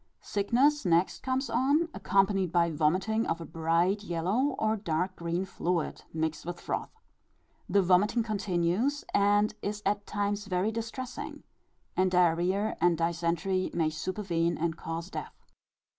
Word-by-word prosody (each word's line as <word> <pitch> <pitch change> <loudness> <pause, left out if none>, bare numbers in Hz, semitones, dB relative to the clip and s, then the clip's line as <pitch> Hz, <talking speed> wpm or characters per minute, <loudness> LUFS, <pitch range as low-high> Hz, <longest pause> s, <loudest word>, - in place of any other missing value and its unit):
Sickness 255 +9 +2
next 175 -1 +2
comes 260 +1 -1
on, 275 +8 +2
accompanied 195 -2 +2
by 170 -1 +3
vomiting 185 +9 +1
of 165 - -1
a 165 - -6
bright 165 +6 +1
yellow, 205 - 0
or 220 0 +1
dark 185 -2 -2
green 170 +2 -2
fluid, 175 -3 -2
mixed 160 -1 -2
with 175 +1 -5
froth. - - -3 0.8
The 200 +1 +4
vomiting 205 +6 +3
continues, 205 +5 0
and 205 +1 +3
is 210 +1 -4
at 205 0 0
times 205 0 -1
very 190 +2 0
distressing; 235 +3 -6 0.5
and 185 0 +3
diarrhœa 180 +4 +2
and 175 -1 +4
dysentery 170 +3 0
may 160 -2 +1
supervene 170 0 -1
and 165 0 -1
cause 165 +2 -5
death. - - -7
185 Hz, 135 wpm, -29 LUFS, 170-210 Hz, 0.8 s, The